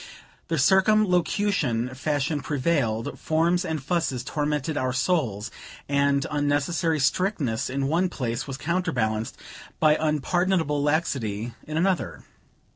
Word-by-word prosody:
The 165 - -1
circumlocution 185 - +2
fashion 145 +2 -1
prevailed, 135 -7 -1
forms 170 +3 +1
and 160 -5 -3
fusses 155 -6 -1
tormented 150 +1 -2
our 130 -3 0
souls, 125 - 0 0.4
and 140 0 +2
unnecessary 145 +3 +1
strictness 140 - 0
in 135 +1 -1
one 175 +5 +1
place 120 -7 -3
was 135 -1 -5
counterbalanced 125 -9 -1 0.4
by 155 -1 +5
unpardonable 155 0 +1
laxity 120 -8 -1
in 155 0 -3
another. 180 -4 0
150 Hz, 110 wpm, -25 LUFS, 130-170 Hz, 0.4 s, by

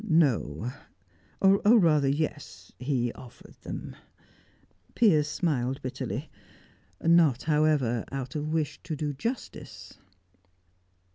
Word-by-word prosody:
"No 125 - +1 0.7
or 195 0 +5 0.2
rather 155 -8 +4
yes, 140 - -3
he 125 -3 -1
offered 125 - -14
them," - - -7 1.0
Piers 160 -11 +4
smiled 135 -5 -1
bitterly. 130 - -4 0.7
"Not 165 -6 +4
however, 150 -6 +2
out 130 -2 -5
of 150 0 -3
wish 155 -2 -2
to 165 -2 -5
do 150 0 -3
justice." 230 - -6
150 Hz, 95 wpm, -28 LUFS, 130-160 Hz, 1.0 s, or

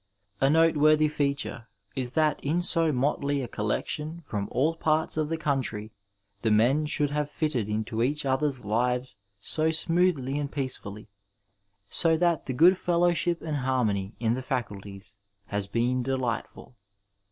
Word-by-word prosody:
A 135 - +3
noteworthy 155 -1 +4
feature 140 -5 -2 0.3
is 125 -1 -2
that 155 -2 +1
in 165 +5 0
so 165 -2 +3
motley 140 +1 0
a - - -4
collection 150 +10 -3
from 105 -9 -4
all 150 +7 +1
parts 160 -1 0
of 155 -1 -1
the 165 - -1
country 130 -9 -2 0.5
the 115 - +1
men 125 +8 +3
should 150 -1 0
have 150 0 -1
fitted 145 -9 -1
into 110 +1 -2
each 145 +4 0
other's 135 -2 0
lives 125 +1 0 0.2
so 155 +9 0
smoothly 160 -4 +1
and 140 -1 -3
peacefully, 115 -7 -5 0.8
so 160 - +3
that 170 -2 +1
the 130 - -2
good 180 +8 +5
fellowship 175 0 +1
and 155 -2 -2
harmony 115 -7 0
in 115 -1 +1
the 130 - -3
faculties 105 -5 -5 0.3
has 100 -1 -2
been 120 +4 0
delightful. 125 -1 -3
135 Hz, 145 wpm, -27 LUFS, 115-155 Hz, 0.8 s, good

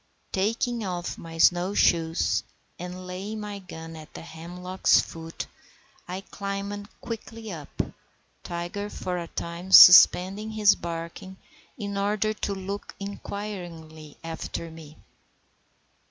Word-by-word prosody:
Taking 225 +4 0
off 180 -3 -4
my 165 0 -9
snow 175 +4 +4
shoes, 165 -3 +3 0.4
and 180 +1 -6
laying 195 +4 -5
my 205 -1 -5
gun 165 -3 -9
at 155 -1 -11
the - - -7
hemlock's 180 +3 +1
foot, 165 0 -5 0.6
I 185 +2 -4
climbed 200 +1 -5
quickly 225 -1 -6
up, 155 -5 -8 0.7
Tiger 175 +4 -4
for 180 -3 -3
a 170 - -5
time 170 +3 -6
suspending 190 +3 +9
his 210 -2 +6
barking 170 +3 -6 0.4
in 200 -2 -4
order 210 +2 +1
to 205 -1 -3
look 195 +1 -6
inquiringly 175 -7 -7
after 165 0 -5
me. 155 -1 -12
185 Hz, 115 wpm, -26 LUFS, 170-205 Hz, 0.7 s, suspending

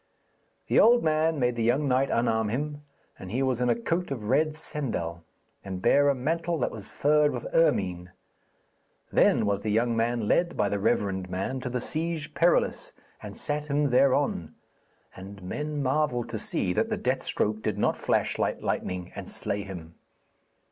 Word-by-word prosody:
The - - +3
old 240 +1 +6
man 155 0 +1
made 125 -1 +1
the 115 - -2
young 125 +6 +2
knight 130 +1 +2
unarm 110 -2 +1
him, 145 +5 -3 0.4
and 95 - -8
he 130 +4 0
was 130 -2 0
in 125 - +2
a - - +3
coat 180 -5 -1
of 130 -6 -4
red 150 +8 +1
sendal, 115 - -3 0.4
and 95 -1 -5
bare 145 +9 +4
a 140 - +2
mantle 165 +6 -1
that 125 - -1
was 105 -3 -9
furred 150 0 +3
with - - -5
ermine. 90 - +1 1.0
Then - - +4
was 100 0 0
the 110 - -3
young 115 +2 +1
man 115 -1 0
led 175 +8 +1
by 100 - +2
the 100 - -1
reverend 95 -2 0
man 95 +8 -3
to 125 - -4
the 125 0 -2
Siege 155 +2 -3
Perilous, 170 +2 +1 0.3
and - - -8
sat 150 0 -2
him 145 -1 0
thereon, 130 - +2 0.6
and 95 +1 -10
men 150 +9 -3
marvelled 130 -3 0
to - - -4
see - - -1
that - - 0
the - - -1
death - - -1
stroke 110 +1 -1
did 105 -2 -2
not - - +1
flash - - 0
like - - 0
lightning 90 -1 -3
and - - -7
slay 100 0 -3
him. 90 -5 -9
125 Hz, 180 wpm, -27 LUFS, 105-150 Hz, 1.0 s, old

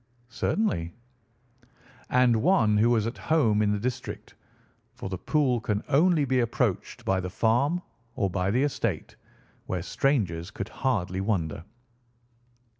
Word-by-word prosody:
"Certainly." 115 - -1 1.1
"And 125 -3 +3
one 120 - +3
who 115 +3 +4
was 115 -3 +2
at 115 - -4
home 120 -10 +2
in 105 -1 +2
the 105 - +1
district, 125 +2 -5 0.6
for - - -6
the 95 - -3
pool 130 0 +1
can 105 -1 -1
only 155 +1 +4
be 130 -1 +1
approached 120 -2 -1
by 95 -1 +1
the 90 0 -4
farm 125 - +1 0.3
or 100 - +1
by 90 0 -1
the 125 +7 +2
estate, 125 - -2 0.5
where 90 -2 -2
strangers 95 - 0
could 100 +2 -6
hardly 95 -8 -1
wander." 85 -7 -1
115 Hz, 135 wpm, -27 LUFS, 95-130 Hz, 1.1 s, who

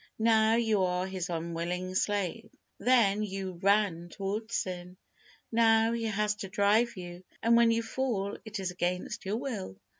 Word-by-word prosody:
Now, 220 0 +4
you 220 -4 +2
are 180 0 0
his 190 -1 -4
unwilling 170 +2 -3
slave. 205 +3 -1 0.3
Then, 215 -3 +3
you 190 -3 -4
ran 195 -4 +2
towards 210 +5 -4
sin, 180 0 -4 0.5
now, 225 0 +4
he 230 -1 -2
has 210 -1 0
to 195 - -6
drive 205 +4 +2
you, 175 0 -8 0.2
and 235 0 +5
when 235 0 +6
you 230 0 +1
fall, 225 -4 -2
it 220 -2 -6
is 185 -2 -2
against 180 +1 -3
your 205 +3 0
will. 220 - -5
200 Hz, 155 wpm, -30 LUFS, 180-225 Hz, 0.5 s, when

